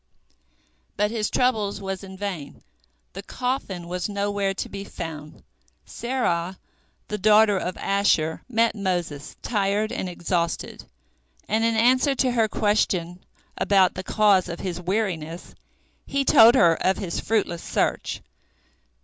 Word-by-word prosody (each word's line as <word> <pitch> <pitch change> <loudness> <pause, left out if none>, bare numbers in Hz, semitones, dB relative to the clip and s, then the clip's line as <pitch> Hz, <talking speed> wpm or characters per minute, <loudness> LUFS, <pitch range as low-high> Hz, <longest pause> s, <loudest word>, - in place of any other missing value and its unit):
But 210 +1 +1
his 220 -2 -1
trouble 220 -5 +1
was 195 -1 -5
in 190 -1 -10
vain; 185 -8 -6 0.5
the 195 - -6
coffin 205 -7 -4
was 180 +2 -3
nowhere 200 -1 -1
to - - -4
be 200 0 -7
found. 155 -5 -8 0.4
Serah, 190 -8 -2 0.5
the 210 - -3
daughter 210 +1 +5
of 185 -1 -3
Asher, 195 -5 +1
met 230 -1 +2
Moses, 175 -8 -3
tired 205 0 0
and 185 - -3
exhausted, 170 -1 -3 0.6
and 220 +2 +1
in 230 0 +2
answer 255 +4 +3
to 260 -1 +1
her 230 -2 +2
question 185 -5 0 0.4
about 190 -2 +4
the 185 - -5
cause 195 -2 +3
of 170 - -5
his 180 -2 -4
weariness, 180 -4 -3 0.5
he 275 0 0
told 230 0 +7
her 170 -9 +6
of 190 +1 +2
his 180 -4 -3
fruitless 200 -6 -1
search. - - -1
200 Hz, 130 wpm, -24 LUFS, 180-220 Hz, 0.6 s, told